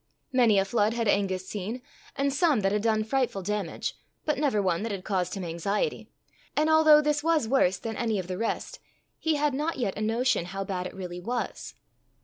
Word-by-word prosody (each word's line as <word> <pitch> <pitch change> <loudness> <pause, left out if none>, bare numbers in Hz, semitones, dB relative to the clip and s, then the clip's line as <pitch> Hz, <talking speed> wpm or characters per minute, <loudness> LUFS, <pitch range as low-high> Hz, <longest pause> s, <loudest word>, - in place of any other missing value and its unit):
Many 235 -5 +5
a 195 - +3
flood 215 +2 +1
had 230 -2 0
Angus 190 -2 +1
seen, 210 +4 -4 0.4
and 275 0 0
some 285 -5 +3
that 195 0 +1
had 210 0 +1
done 220 -1 +2
frightful 235 -4 -1
damage, 205 -3 -3 0.3
but 300 -3 0
never 280 -8 +2
one 185 -3 +1
that 225 +1 -3
had 195 -2 -4
caused 190 -2 -1
him 195 - -4
anxiety; 175 - -2 0.5
and 310 +1 +3
although 310 -1 +7
this 295 0 +1
was 320 -7 +2
worse 210 -7 +3
than 225 +3 -5
any 225 -3 0
of 185 - -3
the 185 +1 -5
rest, 230 - -3 0.4
he 320 -1 +1
had 295 -1 +1
not 300 +4 -1
yet 230 -7 -1
a 210 - -5
notion 225 -3 +1
how 195 +2 -4
bad 185 -2 -3
it - - -11
really 180 -2 -6
was. 240 +7 -4
215 Hz, 205 wpm, -27 LUFS, 195-275 Hz, 0.5 s, although